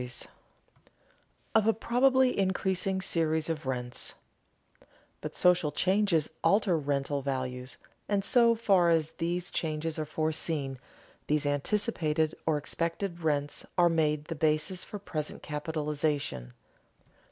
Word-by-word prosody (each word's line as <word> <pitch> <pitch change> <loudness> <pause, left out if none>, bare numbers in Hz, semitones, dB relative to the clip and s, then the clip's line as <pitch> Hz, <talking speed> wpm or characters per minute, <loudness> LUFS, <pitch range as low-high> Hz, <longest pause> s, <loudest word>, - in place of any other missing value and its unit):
[Sidenote: 125 -1 -5 1.2
Of 220 -1 +4
a 225 - +5
probably 255 +3 +3
increasing 190 0 0
series 160 -3 0
of 155 -4 -5
rents;] 125 -1 -3 1.1
But - - -6
social 180 -4 +3
changes 185 -1 +2 0.2
alter 195 +1 +3
rental 140 -1 -1
values, 130 -2 -4 0.3
and 200 -1 +1
so 235 -1 +5
far 195 -6 +3
as 160 -1 +2
these 175 +1 -1
changes 160 0 -2
are 155 - -2
foreseen, 155 -3 -2 0.5
these 150 -1 +1
anticipated 155 0 0
or 155 -2 +3
expected 170 +4 -2
rents 145 -2 -1
are 175 -1 +6
made 150 -2 +1
the 165 - -4
basis 155 +4 0
for 210 - -7
present 155 -7 -5
capitalization. 150 - -2
160 Hz, 120 wpm, -29 LUFS, 150-185 Hz, 1.2 s, are